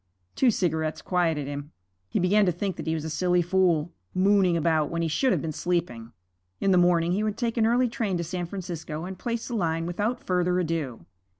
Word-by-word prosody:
Two 260 - +4
cigarettes 160 -6 0
quieted 165 -5 0
him. 145 +1 -6 0.4
He - - -1
began 200 +3 +3
to - - +4
think 185 +2 -3
that - - -6
he 160 - +1
was 155 -1 -4
a - - -3
silly 180 +2 +2
fool, 175 -3 +2 0.2
mooning 190 -2 +4
about 160 -2 +1
when 170 0 -2
he - - +1
should 255 - +1
have - - 0
been 160 - -2
sleeping. 140 -10 -2 0.5
In 195 - +2
the 185 - +5
morning 175 -1 +3
he 195 +4 +1
would 215 -1 -1
take 235 -2 -1
an 225 -2 +3
early 245 +2 +3
train 225 -6 -2
to 170 - -2
San 175 +1 -4
Francisco 170 -4 -5
and 185 0 -7
place 235 +1 -3
the 245 - -5
line 165 -4 0
without 205 +8 -1
further 180 0 +1
ado. 155 - -3
175 Hz, 215 wpm, -26 LUFS, 160-195 Hz, 0.5 s, the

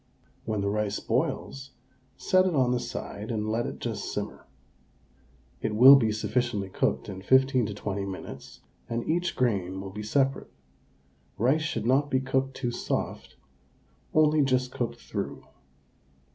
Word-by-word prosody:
When 110 -2 -1
the 100 - 0
rice 105 -1 -1
boils, 135 -1 -2 0.4
set 185 0 +3
it 175 - 0
on 130 -3 +3
the 125 - +1
side 110 -3 -6
and 110 -2 -2
let 115 +2 0
it - - -6
just - - -4
simmer. - - -5 1.1
It 110 -1 -1
will 130 +5 +10
be 115 -5 +3
sufficiently 110 -2 -1
cooked - - -1
in 95 -2 -7
15 130 +1 +3
to 105 - -5
20 100 -1 -3
minutes 70 -8 -8 0.3
and 115 0 -3
each 170 +1 0
grain 95 -7 0
will 95 0 -7
be 105 +2 -6
separate. 135 +5 0 0.9
Rice 130 +9 +2
should 150 - -2
not 135 +4 +3
be 130 - +2
cooked 130 0 -1
too 120 -3 -2
soft, 120 - -3 0.8
only 155 -1 +4
just 130 -2 +1
cooked 120 -2 -3
through. - - -5
120 Hz, 150 wpm, -27 LUFS, 105-135 Hz, 1.1 s, will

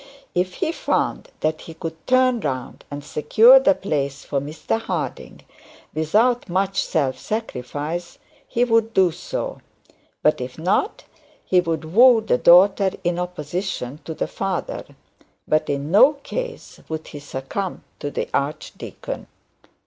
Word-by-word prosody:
If 180 +1 0
he 335 -4 -1
found - - -1
that 155 0 0
he 165 - -10
could 160 -1 -7
turn 255 -1 +4
round 130 - -4
and 145 0 -6
secure 220 - +6
the 285 +2 +4
place 140 -6 -2
for 140 -2 -1
Mr 155 +9 -3
Harding - - -4 0.5
without 215 +10 +2
much 195 +2 +1
self 135 -5 0
sacrifice, 170 - -4 0.3
he 240 - +1
would 225 -2 +2
do 185 -2 +5
so; - - -5 0.6
but 150 -3 +3
if 125 0 -6
not, 185 - 0 0.4
he 180 -1 +4
would 165 -1 -3
woo 245 +2 +8
the 215 - +1
daughter 190 +3 +6
in 175 0 0
opposition 175 -5 -4
to 160 - -5
the - - -1
father. 195 -2 -3 0.6
But 155 0 +1
in 145 +2 -2
no 260 +10 +7
case 475 - -6
would 160 0 -5
he 145 - -8
succumb 145 +7 -5 0.2
to 145 - -3
the - - -3
archdeacon. 140 +2 -4
175 Hz, 140 wpm, -22 LUFS, 150-220 Hz, 0.6 s, woo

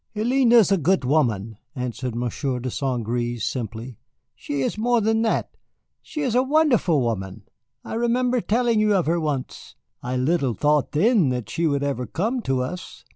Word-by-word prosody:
"Hélène 240 +3 +2
is 225 -4 +6
a 195 - +3
good 170 -1 +1
woman," 115 -7 0 0.2
answered 125 -1 -4
Monsieur 125 +2 -2
de 125 +1 -4
St. 125 -4 -2
Gré, 120 +1 -2
simply. 115 +1 -5 0.3
"She 145 -1 -4
is - - -1
more 240 +2 +2
than 220 +1 +1
that, 225 - 0 0.5
she 305 - -6
is 255 -5 0
a 250 - +4
wonderful 260 - +2
woman. 100 -3 -3 0.4
I - - -7
remember 240 +2 +1
telling 230 +1 +1
you 215 -1 +3
of 185 - +1
her 170 +3 +1
once. 145 -5 -4 0.3
I 125 +1 -3
little 135 -2 +1
thought 150 +6 +1
then 195 - +3
that 125 -3 -3
she 165 0 0
would 140 -2 0
ever 130 -3 -2
come 230 +8 -2
to 130 - 0
us." 180 +7 -8
150 Hz, 180 wpm, -23 LUFS, -, 0.5 s, is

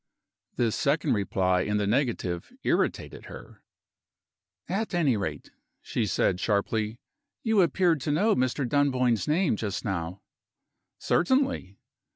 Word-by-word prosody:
This 115 -3 +1
second 150 -1 +1
reply 95 -3 +1
in 105 +2 0
the 105 - 0
negative 105 -7 -1
irritated - - -1
her. - - -12 1.1
"At 200 +1 -2
any 150 -8 +3
rate," 80 -8 -4 0.3
she - - -1
said, 90 - +1
sharply, 105 +2 0 0.5
"you 220 -3 +3
appeared 170 -2 +2
to 145 - -1
know 205 +9 +3
Mr. 130 +1 0
Dunboyne's 130 -5 +1
name, 160 - +2
just 105 0 -4
now." 90 -2 -3 0.7
"Certainly!" 260 - +1
125 Hz, 120 wpm, -27 LUFS, 100-160 Hz, 1.1 s, any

